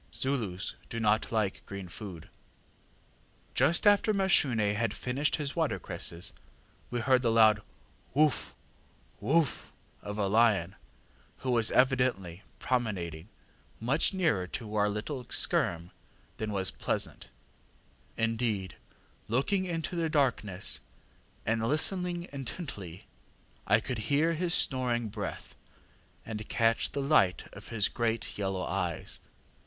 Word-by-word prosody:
Zulus 110 - -2 0.2
do 115 - -4
not 110 0 +2
like 110 -4 0
green 100 -2 -6
food. 90 -2 -8 1.3
ŌĆ£Just 170 +6 +3
after 205 +1 +5
Mashune 130 - +3
had 110 -1 -1
finished 135 +4 0
his 145 -3 -3
watercress, 90 - -2 0.6
we 120 -1 -2
heard 130 +1 +4
the 120 - +2
loud 110 -2 +5 0.5
ŌĆśwoof! 150 -1 +2 0.7
woof! 145 +7 +1 0.3
ŌĆÖ - - -10
of 105 - -4
a 105 - +1
lion, 100 -3 +3 0.7
who 130 - -1
was 115 -2 +4
evidently 125 -9 +2 0.2
promenading 95 -9 -2 0.5
much 130 +8 +2
nearer 160 - +1
to 105 +2 -6
our 105 0 +3
little 115 +6 -4
skerm 85 -4 0 0.5
than 110 -1 -3
was 95 -2 +1
pleasant. - - -3 0.9
Indeed, 115 -5 0
on - - -27 0.4
looking 185 +9 +1
into 165 -1 -2
the 165 -2 0
darkness 120 - +1 0.7
and 115 0 +1
listening 175 - +1
intently, 120 - -6 0.6
I 105 - +5
could 120 0 -4
hear 155 +4 +3
his 170 +1 +2
snoring 120 -4 +2
breath, - - -6 0.7
and 110 -1 -6
catch 115 0 +2
the 140 - -2
light 135 -11 +3
of - - -11
his 105 -2 +2
great 115 -1 -2
yellow 95 -2 -2
eyes. - - -3
115 Hz, 120 wpm, -30 LUFS, 100-140 Hz, 1.3 s, after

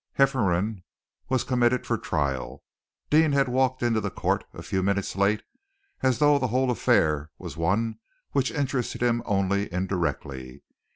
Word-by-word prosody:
Hefferom 110 -7 +2 0.5
was 130 -2 +1
committed 125 -1 +1
for - - 0
trial. 70 -3 -2 0.5
Deane 155 -1 +5
had 140 -1 +3
walked 130 0 +1
into 115 -2 +2
the 105 - -2
court - - -1
a - - -10
few 95 -2 -1
minutes 100 0 -1
late, 100 +2 +2 0.6
as 130 -2 +2
though 145 -1 +4
the 130 - 0
whole 130 +2 +1
affair 75 -9 +2
was - - -8
one 100 - 0 0.3
which 135 -1 +1
interested 135 -5 -2
him 120 -1 +2
only 100 -1 0
indirectly. 75 -8 -3
110 Hz, 150 wpm, -26 LUFS, 95-130 Hz, 0.6 s, Deane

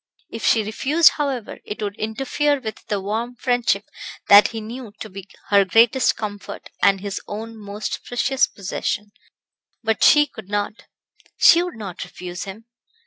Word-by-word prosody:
If 225 - -7
she 225 - +3
refused, 280 +10 +4
however, 275 -7 -3
it 210 - -7
would 205 -1 -3
interfere 270 +6 0
with 220 -4 -8
the 205 - -1
warm 225 +5 -3
friendship 245 -5 0 0.4
that 205 +1 +9
he 225 - -6
knew 225 0 -8
to 215 - -8
be 195 0 -9 0.2
her 200 -1 +6
greatest 230 +6 +4
comfort 205 -2 -7
and 195 -1 +4
his 200 -1 -4
own 225 +2 -6
most 205 0 -6
precious 260 +2 +1
possession; 205 +1 -4 0.7
but 225 -1 0
she 295 -1 +7
could 220 -8 -12
not, 205 +1 -3 0.5
she 335 - +7
would 355 -1 -4
not 200 -6 -6
refuse 180 +1 -7
him. 200 +3 -9
220 Hz, 155 wpm, -22 LUFS, 200-245 Hz, 0.7 s, that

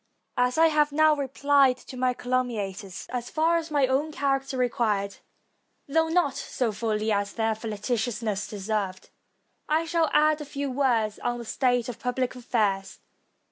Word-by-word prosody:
As 250 +2 +2
I 325 - +6
have 300 -1 +2
now 310 +1 +4
repHed 275 -1 +2
to 260 - -9
my 250 0 +1
caltmmiators, 220 -7 -3
as 245 -1 -4
far 325 +2 +2
as 330 -1 -4
my 290 -3 +3
own 270 +4 0
character 275 -2 -1
required, 215 -5 0 0.7
though 320 +3 +2
not 325 -5 +2
so 255 -4 -2
fully 215 0 -1
as 200 -1 0
their 225 -1 +1
flagitiousness 220 -1 -2
deserved, 200 -2 -3 0.6
I 315 +2 +2
shall 330 -1 +1
add 305 0 +3
a - - -5
few 280 -1 -4
words 240 -6 +1
on 240 0 -2
the 235 - -7
state 245 0 +1
of 245 - -6
pubhc 250 0 -1
affairs. 210 -6 -1
250 Hz, 155 wpm, -26 LUFS, 220-285 Hz, 0.7 s, I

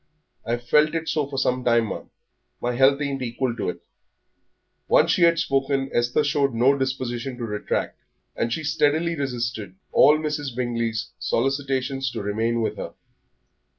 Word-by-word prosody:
I've 120 +1 -2
felt 150 +5 +4
it 165 0 -2
so 150 -3 0
for 140 -1 -6
some 125 -1 0
time, 115 -2 +3
ma'am. - - -6 0.5
My 120 0 -1
health 135 +2 +4
ain't 140 -2 -2
equal 120 0 -2
to - - -2
it." - - -6 1.1
Once - - +4
she - - +1
had 170 0 +5
spoken, 135 -1 0
Esther 120 +5 +2
showed 140 -3 +1
no 130 +4 +4
disposition 130 -1 -3
to 120 - -5
retract, 105 -2 -3 0.4
and 115 - -1
she 160 - -2
steadily 155 +3 +1
resisted 120 - -3 0.2
all 150 - +6
Mrs. 150 -4 -3
Bingley's 115 -2 -2
solicitations 135 +1 -1
to 115 - -4
remain 115 +3 0
with - - -2
her. - - -7
130 Hz, 155 wpm, -24 LUFS, 120-140 Hz, 1.1 s, all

